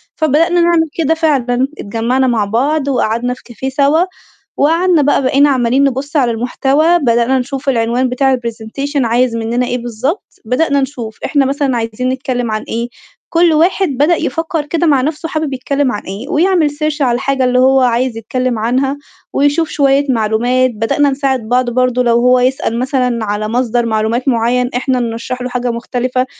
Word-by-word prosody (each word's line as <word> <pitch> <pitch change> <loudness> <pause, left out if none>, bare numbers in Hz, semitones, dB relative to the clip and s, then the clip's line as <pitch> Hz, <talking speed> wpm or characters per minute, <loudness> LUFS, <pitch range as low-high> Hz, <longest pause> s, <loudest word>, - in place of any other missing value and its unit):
فبدأنا 325 +3 +2
نعمل 335 -2 +2
كده 325 -1 +2
فعلًا، 265 -6 +1
اتجمّعنا 235 +5 0
مع 225 -4 +1
بعض 275 +7 0
وقعدنا 245 -2 0
في 255 - -14
كافيه 245 +2 -5
سَوا 285 +5 +2 0.5
وقعدنا 330 +2 +3
بقى 285 -1 +2
بقينا 275 +3 +3
عمّالين 255 0 +2
نبُص 280 +2 -2
على 245 -4 +2
المحتوى، 275 +8 +1
بدأنا 240 0 +2
نشوف 275 +2 -3
العنوان 245 +1 0
بتاع 265 +1 +2
الpresentation 240 +5 -4
عايز 235 +1 +1
منّنا 230 +2 -1
إيه 245 +1 -2
بالضبط. 240 - -3 0.2
بدأنا 280 +3 +1
نشوف 240 -5 -5
إحنا 285 -3 +2
مثلًا 275 -2 0
عايزين 230 +3 -2
نتكلِّم 255 -3 -2
عن 215 - -2
إيه؟ 235 +1 -3 0.4
كل 335 0 +3
واحد 355 +4 +2
بدأ 290 +6 +2
يفكّر 325 -2 -2
كده 330 +2 0
مع 275 -4 +3
نَفْسه 310 +3 -3
حابب 310 -3 -2
يتكلِّم 275 +1 -1
عن 205 - -4
إيه 205 +10 -7
ويعمل 340 -1 +2
search 305 0 -3
على 245 -3 +2
الحاجة 265 +1 -1
اللي 250 0 +2
هو 265 +1 +4
عايز 245 -1 +1
يتكلِّم 250 +1 -2
عنها 260 +5 0 0.4
ويشوف 290 +3 +1
شوية 280 -1 +2
معلومات، 240 +2 +1
بدأنا 225 +6 +1
نساعد 270 -2 -1
بعض 250 0 +2
برضه 250 0 +1
لو 235 -1 +2
هو 250 0 +4
يسأل 250 -2 0
مثلًا 250 -3 -1
على 210 +1 -2
مصدر 240 0 0
معلومات 225 +4 -1
معيّن 245 +1 +1
إحنا 255 0 0
نرشّح 235 +2 -4
له 250 - -3
حاجة 245 -1 -2
مختلفة، 250 +2 -2
255 Hz, 170 wpm, -14 LUFS, 240-285 Hz, 0.5 s, هو